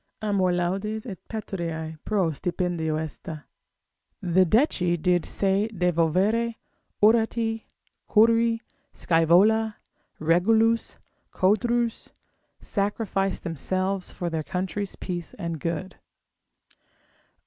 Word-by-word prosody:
Amor 200 -4 +1
laudis 195 +5 -1
et 195 -8 -7
patriae 170 -7 -4
pro 195 -6 +1
stipendio 170 -1 -2
est; 160 -2 -6 1.0
the 185 +1 +3
Decii 180 - +2
did 180 0 +1
se 200 +2 +1
devovere, 185 +5 +1 0.5
Horatii, 225 0 +2 0.4
Curii, 230 +1 +4 0.3
Scaevola, 200 +7 +3 0.4
Regulus, 220 +8 +2 0.3
Codrus, 235 +4 +1 0.5
sacrifice 200 -1 -1
themselves 185 +4 -2
for 175 -1 -4
their 160 -1 -1
country's 190 +4 -3
peace 175 -2 -5
and 170 -4 -4
good. 170 +4 -4
190 Hz, 85 wpm, -25 LUFS, 175-220 Hz, 1.0 s, Curii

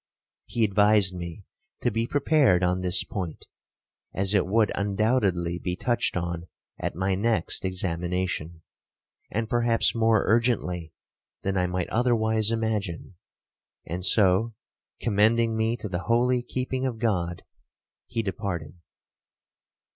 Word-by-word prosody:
He 115 - 0
advised 105 -1 +4
me 90 +2 -7 0.4
to 120 - +2
be 115 +2 -1
prepared 140 - +3
on 90 +1 +1
this 90 0 +2
point, 90 -6 -6 0.7
as 95 +1 +4
it 100 -4 +2
would 110 +2 +2
undoubtedly 100 -4 0
be 90 0 -3
touched 120 0 0
on 85 0 -4 0.3
at - - -3
my 95 +2 0
next 105 -1 0
examination, 90 -2 -2 0.7
and 115 +1 -2
perhaps 120 0 +2
more 115 -2 +3
urgently 105 -8 0 0.5
than 100 0 -1
I 90 -1 +1
might 90 0 -2
otherwise 110 -2 +2
imagine; 110 -7 -2 0.7
and 90 +3 -5
so, 100 +3 +3 0.4
commending 115 +2 +2
me 110 +2 0
to 110 - -6
the 90 -3 -3
holy 125 +2 +2
keeping 130 +1 -3
of 130 -4 -2
God, 90 -7 -1 0.6
he 115 - -2
departed. 90 -6 -4
100 Hz, 125 wpm, -26 LUFS, 90-115 Hz, 0.7 s, advised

